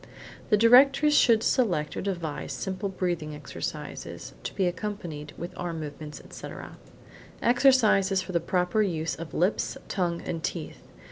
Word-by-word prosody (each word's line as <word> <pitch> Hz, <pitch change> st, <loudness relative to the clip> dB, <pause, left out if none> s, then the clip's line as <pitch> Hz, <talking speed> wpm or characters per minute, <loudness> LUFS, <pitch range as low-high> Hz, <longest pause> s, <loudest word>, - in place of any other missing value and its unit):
The 210 Hz, -, +5 dB
directress 270 Hz, +6 st, +6 dB
should 230 Hz, -6 st, +5 dB
select 175 Hz, -12 st, +1 dB
or -, -, -3 dB
devise 170 Hz, -6 st, -3 dB
simple 190 Hz, +1 st, -3 dB
breathing 175 Hz, -5 st, -2 dB
exercises, 150 Hz, -2 st, -6 dB
to -, -, -6 dB
be 190 Hz, -, +1 dB
accompanied 175 Hz, -6 st, -4 dB
with 175 Hz, -, -6 dB
arm 170 Hz, -2 st, -4 dB
movements, 150 Hz, -1 st, -7 dB
etc. -, -, -9 dB, 0.6 s
Exercises 235 Hz, -6 st, +4 dB
for 185 Hz, -2 st, -1 dB
proper 180 Hz, +4 st, +1 dB
use 165 Hz, -5 st, -1 dB
of 165 Hz, -1 st, -8 dB
lips, 180 Hz, +5 st, +1 dB
tongue, 175 Hz, -3 st, -1 dB
and 165 Hz, -1 st, -4 dB
teeth. -, -, -4 dB
180 Hz, 135 wpm, -27 LUFS, 165-210 Hz, 0.6 s, directress